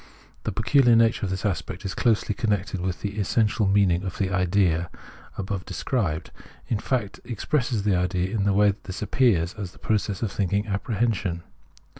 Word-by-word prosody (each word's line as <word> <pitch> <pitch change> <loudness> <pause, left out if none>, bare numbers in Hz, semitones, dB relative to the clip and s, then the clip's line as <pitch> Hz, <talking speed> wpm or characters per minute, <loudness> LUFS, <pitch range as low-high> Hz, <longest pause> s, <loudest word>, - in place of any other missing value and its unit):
The - - 0
pecuHar 120 +3 +4
nature 115 -2 +3
of - - -4
this 95 +2 -3
aspect 95 0 -3
is 95 - -2
closely 110 -2 +1
connected 100 -3 -1
with 90 -2 -3
the 105 +1 -3
essential 105 +1 +1
meaning 95 -3 +3
of 95 -3 -5
the 95 -1 0
idea 90 -2 +2
(ISea) - - -19 0.4
above 95 -1 -3
described, 90 - -2 0.4
in 110 - 0
fact, 110 -6 -2
expresses 120 0 -1
the 100 -2 +2
idea 90 +1 0
in 100 -2 +1
the 100 - +3
way 100 0 +4
this 95 +2 -6
appears 105 -7 +2
as 100 -5 -6
the - - -18
process 105 -1 -1
of 105 - -1
thinking 100 +1 0
apprehension. 100 -4 -1
100 Hz, 175 wpm, -25 LUFS, 95-110 Hz, 0.4 s, pecuHar